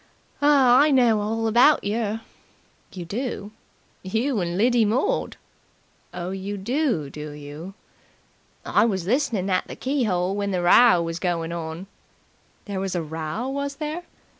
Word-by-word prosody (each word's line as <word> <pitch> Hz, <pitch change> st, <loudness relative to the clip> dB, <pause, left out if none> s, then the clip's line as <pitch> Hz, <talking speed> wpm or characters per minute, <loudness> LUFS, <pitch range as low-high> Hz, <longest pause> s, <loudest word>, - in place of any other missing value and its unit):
"I 280 Hz, -1 st, +5 dB
know 240 Hz, -6 st, +4 dB
all 225 Hz, +2 st, -2 dB
about 245 Hz, +7 st, +5 dB
yer." 220 Hz, +1 st, -2 dB, 0.7 s
"You 180 Hz, -2 st, -7 dB
do?" 210 Hz, +1 st, -4 dB, 0.5 s
"You 225 Hz, +6 st, -1 dB
and 175 Hz, -1 st, -2 dB
Lidy 240 Hz, +2 st, +3 dB
Mord." 265 Hz, -, 0 dB, 0.7 s
"Oh, 175 Hz, +1 st, -5 dB
you 195 Hz, +2 st, -5 dB
do, 225 Hz, -, -1 dB
do 150 Hz, +1 st, -7 dB
you?" 150 Hz, +6 st, -9 dB, 0.9 s
"I -, -, +3 dB
was 190 Hz, -6 st, 0 dB
listening 230 Hz, -4 st, 0 dB
at 185 Hz, -, 0 dB
the -, -, -8 dB
key 260 Hz, -4 st, -1 dB
'ole 180 Hz, +1 st, 0 dB
while 205 Hz, 0 st, -2 dB
the 180 Hz, -2 st, -1 dB
row 180 Hz, 0 st, +6 dB
was 165 Hz, +1 st, -4 dB
goin' 170 Hz, -2 st, -2 dB
on." 165 Hz, +1 st, -5 dB, 0.8 s
"There 200 Hz, -2 st, -4 dB
was 190 Hz, -1 st, -3 dB
a 170 Hz, -, -1 dB
row, 160 Hz, +8 st, -4 dB
was 280 Hz, +1 st, -3 dB
there?" 305 Hz, +3 st, -4 dB
205 Hz, 145 wpm, -24 LUFS, 175-250 Hz, 0.9 s, row